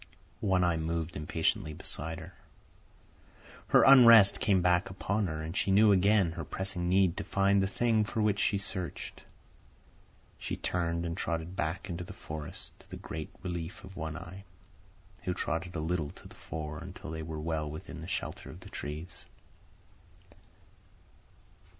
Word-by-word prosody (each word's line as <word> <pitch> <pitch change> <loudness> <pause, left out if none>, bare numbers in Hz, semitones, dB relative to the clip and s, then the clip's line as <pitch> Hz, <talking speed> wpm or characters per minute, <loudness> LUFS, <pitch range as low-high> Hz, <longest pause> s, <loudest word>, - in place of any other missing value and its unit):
One 95 -3 +2
Eye 85 -2 +2
moved 80 0 -2
impatiently 80 0 -1
beside 80 +2 -1
her; 90 +3 -10 1.3
her - - +6
unrest 115 -6 +9
came 100 -3 +3
back 90 0 +3
upon 100 +2 -1
her, 80 -1 -4
and 80 +3 -5
she 95 +1 +1
knew 105 +2 +6
again 100 -2 +4
her 80 0 -5
pressing 90 +2 -2
need 95 -2 +4
to - - -2
find 100 0 +3
the 95 - +2
thing 110 +2 +2
for 110 +2 -3
which 105 -2 +2
she 100 - +2
searched. 95 -5 -5 1.2
She - - -4
turned 85 -1 -1
and 85 0 -3
trotted 85 0 -3
back 85 +2 -2
into 90 -1 -4
the - - -9
forest, 75 -1 -7
to - - -18
the - - -7
great 80 -1 -6
relief 85 -2 -5
of 95 0 -11
One 80 -2 -4
Eye, 90 +3 -9 0.8
who 90 - -1
trotted 85 +1 -2
a - - -1
little 80 -1 -1
to - - -12
the - - -14
fore 75 -1 -6
until 90 -2 -8
they 80 0 -4
were 80 0 -5
well 75 -1 -2
within 80 +1 -8
the - - -7
shelter - - -4
of 90 - -11
the 95 - -11
trees. 80 +4 -6
90 Hz, 160 wpm, -31 LUFS, 80-95 Hz, 1.3 s, unrest